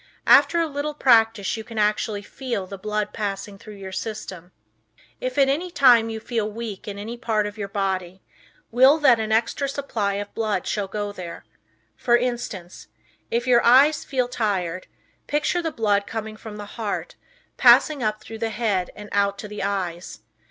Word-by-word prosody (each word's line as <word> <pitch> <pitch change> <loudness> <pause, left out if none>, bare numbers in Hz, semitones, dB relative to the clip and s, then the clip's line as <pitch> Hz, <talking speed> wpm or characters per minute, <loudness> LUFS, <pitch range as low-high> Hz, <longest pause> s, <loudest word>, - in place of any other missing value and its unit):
After 340 - +6
a 335 - +2
little 295 0 -4
practice 225 -7 +3
you 220 - -6
can 225 0 -10
actually 210 0 0
feel 240 -5 -4
the 195 +1 -9
blood 210 +1 -2
passing 200 -1 -4
through 210 0 -11
your 195 -1 -8
system. 190 -4 -6 0.7
If, 255 +1 -4
at 275 -1 +5
any 310 +7 0
time, 245 -8 +5
you 220 0 -4
feel 220 -2 -2
weak 220 -3 -7
in 200 -1 -5
any 225 +4 -6
part 220 -3 0
of 205 - -4
the 205 -2 -5
body, 190 -2 -3 0.5
will 260 +5 +6
that 265 -7 +5
an 220 0 -2
extra 235 +5 +1
supply 230 -8 -2
of 205 0 -5
blood 215 -5 -1
shall 205 -2 -2
go 205 +1 -4
there. 175 - -8 0.5
For 240 - +3
instance, 235 -7 -4 0.4
if 235 +1 -1
your 245 -2 +4
eyes 280 +5 +5
feel 255 -3 -1
tired, 185 -7 -2 0.4
picture 300 +4 0
the 325 -1 -2
blood 205 -5 +1
coming 220 -1 -5
from 215 -1 -9
the 205 - -7 0.2
heart, 210 -2 -3 0.4
passing 300 -3 +6
up 215 -1 -2
through 225 -1 -9
the 225 0 -1
head 210 -5 -1
and 210 0 -9
out 200 0 +1
to 210 - -7
the 210 0 -7
eyes. 180 - -3
215 Hz, 180 wpm, -23 LUFS, 200-240 Hz, 0.7 s, After